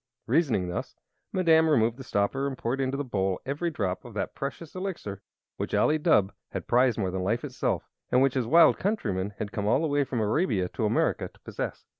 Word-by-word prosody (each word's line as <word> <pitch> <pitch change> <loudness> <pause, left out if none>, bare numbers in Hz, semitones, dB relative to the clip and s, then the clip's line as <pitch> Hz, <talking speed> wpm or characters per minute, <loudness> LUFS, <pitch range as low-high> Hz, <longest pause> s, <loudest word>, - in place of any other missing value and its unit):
Reasoning 120 - +2
thus, 90 - -4 0.4
Madame 160 -3 +4
removed 115 -4 +3
the 135 - -8
stopper 125 +5 0
and 135 -2 -4
poured 125 +4 -1
into 135 +1 -1
the 145 - -1
bowl 95 -7 -1
every 145 +6 -1
drop 100 - -2
of 120 -3 -11
that 100 - -2
precious 145 +3 -6
Elixir 180 - -5 0.4
which - - -2
Ali 155 +1 +3
Dubh 105 - +3 0.2
had - - -5
prized 125 -1 +3
more 95 -4 -1
than 95 0 -2
life 115 +6 0
itself, 135 -4 -2 0.2
and 125 - +5
which 135 0 +3
his 130 -4 -1
wild 165 +6 +6
countrymen 105 - -1
had 105 - -4
come 105 -1 -2
all 120 +7 +3
the 165 - +1
way 145 -1 +2
from 130 -3 -3
Arabia 110 - +1
to 110 - -2
America 110 - +1
to - - -22
possess. - - -5
125 Hz, 210 wpm, -27 LUFS, 105-145 Hz, 0.4 s, wild